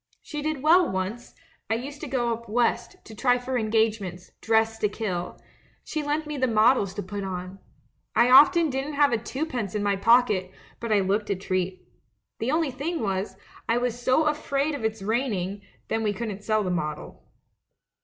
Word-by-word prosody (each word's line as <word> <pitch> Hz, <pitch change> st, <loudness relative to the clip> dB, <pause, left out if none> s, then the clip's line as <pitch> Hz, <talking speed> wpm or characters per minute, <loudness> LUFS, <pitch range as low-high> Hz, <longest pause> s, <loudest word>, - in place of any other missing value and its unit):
She 300 Hz, -1 st, -5 dB
did 305 Hz, -2 st, -3 dB
well 345 Hz, +4 st, +5 dB
once; 190 Hz, +6 st, -4 dB, 0.3 s
I 225 Hz, -, +2 dB
used 280 Hz, +5 st, -6 dB
to -, -, -5 dB
go 240 Hz, -3 st, 0 dB
up 235 Hz, 0 st, -8 dB
West, 235 Hz, +2 st, 0 dB
to 220 Hz, -, -11 dB
try 245 Hz, +3 st, +2 dB
for 255 Hz, +1 st, -4 dB
engage 220 Hz, -1 st, +1 dB
ments, 180 Hz, -1 st, -8 dB
dressed 225 Hz, 0 st, +1 dB
to 210 Hz, -, +2 dB
kill 185 Hz, -5 st, -4 dB, 0.2 s
— -, -, -33 dB, 0.2 s
she 310 Hz, -, -3 dB
lent 300 Hz, +2 st, -1 dB
me 300 Hz, -1 st, -5 dB
the 260 Hz, -1 st, +1 dB
models 215 Hz, -3 st, +3 dB
to 205 Hz, -, -4 dB
put 200 Hz, +2 st, -5 dB
on. 185 Hz, 0 st, -6 dB, 0.6 s
I 245 Hz, -, +4 dB
often 320 Hz, +4 st, +7 dB
didn't 270 Hz, +3 st, -3 dB
have 285 Hz, -1 st, +4 dB
twopence 255 Hz, -, -3 dB
in 210 Hz, -, -1 dB
my 200 Hz, -1 st, +2 dB
pocket, 210 Hz, -3 st, +3 dB, 0.3 s
but 230 Hz, -1 st, -4 dB
I 205 Hz, -2 st, +4 dB
looked 200 Hz, +3 st, 0 dB
a 200 Hz, -, +1 dB
treat. 185 Hz, -1 st, -3 dB, 0.5 s
The 230 Hz, -, -1 dB
only 310 Hz, -1 st, +1 dB
thing 300 Hz, +7 st, -3 dB
was, 195 Hz, -2 st, -2 dB, 0.3 s
I 230 Hz, -, +3 dB
was 245 Hz, 0 st, -2 dB
so 260 Hz, +6 st, +3 dB
afraid 300 Hz, -1 st, 0 dB
of 285 Hz, -, -5 dB
its 220 Hz, -2 st, -2 dB
raining 205 Hz, -4 st, -1 dB
— -, -, -37 dB
then 225 Hz, -, 0 dB
we 210 Hz, -2 st, 0 dB
couldn't 205 Hz, -2 st, -5 dB
sell 215 Hz, 0 st, +1 dB
the 185 Hz, -, -2 dB
model.' 155 Hz, -4 st, -4 dB
225 Hz, 195 wpm, -26 LUFS, 200-265 Hz, 0.6 s, often